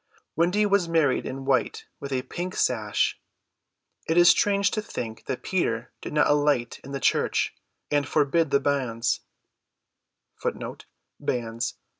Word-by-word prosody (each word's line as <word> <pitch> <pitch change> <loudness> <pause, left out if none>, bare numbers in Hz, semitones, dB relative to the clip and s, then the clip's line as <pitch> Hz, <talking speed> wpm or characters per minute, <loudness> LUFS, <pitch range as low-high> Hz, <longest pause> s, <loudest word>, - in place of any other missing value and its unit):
Wendy 180 +6 +3
was 200 -4 +2
married 160 -5 +2
in 135 +1 -6
white 135 -1 0
with 140 - -6
a 130 -1 0
pink 180 +7 -5
sash. 110 -4 0 0.9
It 165 - +2
is 175 0 +8
strange 200 -1 +3
to 215 - -1
think 115 - -6
that 130 - -3
Peter 120 -11 -1
did - - -6
not 150 0 +3
alight 145 -5 +2
in 135 - -9
the 140 - -3
church - - +1 0.4
and 145 -2 +2
forbid 155 +2 +2
the 140 - +3
banns. 125 -5 0
145 Hz, 130 wpm, -26 LUFS, 130-170 Hz, 0.9 s, is